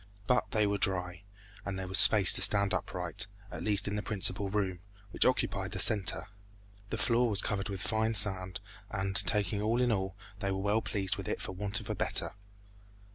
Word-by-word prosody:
But 125 +3 0
they 110 -4 0
were 100 0 -2
dry, 90 -2 0 0.4
and 100 -1 -5
there 95 -1 -6
was 95 +1 +6
space 100 -2 +7
to - - +4
stand 100 -2 +3
upright, 95 - -4 0.2
at - - -7
least 105 -2 +2
in 105 - -3
the 105 - -3
principal 100 -1 0
room, 95 -3 -2 0.3
which - - +1
occupied - - -1
the - - -4
center. 95 -6 +2 0.6
The 115 - -4
floor 120 +3 +1
was 100 -3 +4
covered 100 0 -3
with 95 -2 -6
fine 110 +2 -1
sand, 95 -2 +3 0.3
and 95 0 -4
taking 100 +1 0
all 115 +3 0
in 125 -1 +1
all 95 -2 -3 0.2
they 100 -1 -3
were 95 - -2
well 105 +3 0
pleased 95 -5 -3
with - - -7
it - - -3
for - - -6
want 100 +4 -3
of 110 - -11
a - - -3
better. - - -2
100 Hz, 200 wpm, -30 LUFS, 95-105 Hz, 0.6 s, space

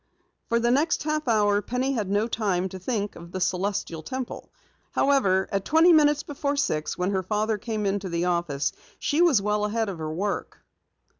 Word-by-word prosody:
For 235 - +2
the 235 +1 +2
next 295 +6 +2
half 305 -1 -1
hour 205 -3 +3
Penny 250 +5 -1
had 215 -7 -2
no 205 +3 +1
time 195 -6 0
to 190 - -8
think 205 0 -2
of 170 0 -11
the 185 - -4
Celestial 185 -3 -1
Temple. 255 +10 -6 0.4
However, 200 -10 +3
at 195 -1 0
twenty 325 - +5
minutes 295 -1 +4
before 285 0 -2
six, 155 - -1
when 180 +2 0
her 190 -1 0
father 210 +3 -1
came 215 -1 -3
into 195 -1 -1
the 170 0 -1
office, 170 -5 0 0.3
she 300 +4 0
was 290 - +4
well 210 0 0
ahead 220 +1 0
of 180 -4 -6
her 155 -1 -3
work. 195 +5 -4
210 Hz, 190 wpm, -25 LUFS, 185-260 Hz, 0.4 s, twenty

